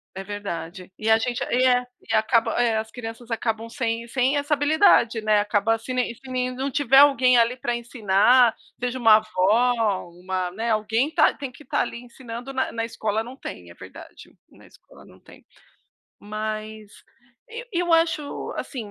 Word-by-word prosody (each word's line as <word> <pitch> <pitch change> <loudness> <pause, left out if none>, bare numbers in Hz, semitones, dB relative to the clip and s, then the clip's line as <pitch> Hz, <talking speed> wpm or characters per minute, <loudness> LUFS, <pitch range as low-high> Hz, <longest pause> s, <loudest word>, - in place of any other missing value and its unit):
É 195 - -6
verdade. 185 -3 -7
E 220 +1 -2
a 220 - +6
gente, 240 +1 -2
e 250 +1 +2
é 250 -1 +3 0.3
e - - -1
acaba 225 +1 +2
é 230 -2 +1
as 220 0 -4
crianças 230 0 -9
acabam 225 0 -3
sem 230 -2 -3
sem 260 +3 +1
essa 290 +1 -1
habilidade, 290 - +3
né, 215 -1 +3
acaba 210 +2 +1
se 255 +3 -7
ne 250 -2 -1
se 245 - -25 0.3
não 270 +2 -3
tiver 270 0 +3
alguém 260 -3 +5
ali 235 +1 +3
para 240 -1 -3
ensinar, 235 0 +3 0.2
seja 250 +1 -3
uma 225 -3 +6
avó, 215 +4 +2 0.5
uma 185 0 -3
né, 225 +4 -3
alguém 220 +6 0
está 325 - +3
tem 275 -3 -7
que 300 - -16
estar 265 - -1
ali 235 - -5
ensinando, 245 +1 -9
na 260 -1 -2
na 230 - -3
escola 220 -1 -2
não 245 +3 -10
tem, 90 - -9
é 85 - -12
verdade. - - -13
Na - - -19
escola - - -19
não - - -18
tem. - - -18 0.8
Mas, 215 0 -6 0.6
e 470 +2 -8
eu 345 -1 0
acho, 325 -3 0
assim, 225 -7 -6
230 Hz, 180 wpm, -23 LUFS, 215-255 Hz, 0.8 s, a